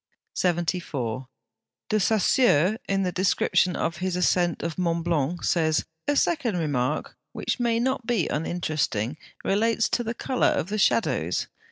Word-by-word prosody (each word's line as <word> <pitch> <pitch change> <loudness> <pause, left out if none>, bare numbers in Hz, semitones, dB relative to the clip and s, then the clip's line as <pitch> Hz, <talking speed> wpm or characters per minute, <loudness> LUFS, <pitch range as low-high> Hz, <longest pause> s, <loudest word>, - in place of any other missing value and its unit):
74. 160 -9 -1 0.6
De 215 - +2
Saussure, 210 - +3
in 195 0 +1
the 180 - 0
description 185 -1 +2
of 165 - -2
his 185 0 -2
ascent 175 -1 +1
of 165 +1 -3
Mont 170 -2 0
Blanc, 170 0 0
says, 160 -2 +1 0.2
"A 290 - +2
second 280 - +1
remark, 145 -3 -1 0.2
which - - -2
may 235 -1 +1
not 255 -1 -1
be 230 -9 +1
uninteresting, 155 -6 -1 0.3
relates 225 +3 +2
to 240 - 0
the 230 +1 -3
colour 255 +1 +1
of 170 - 0
the 215 +1 -2
shadows. 90 - +1
180 Hz, 145 wpm, -25 LUFS, 155-220 Hz, 0.6 s, Saussure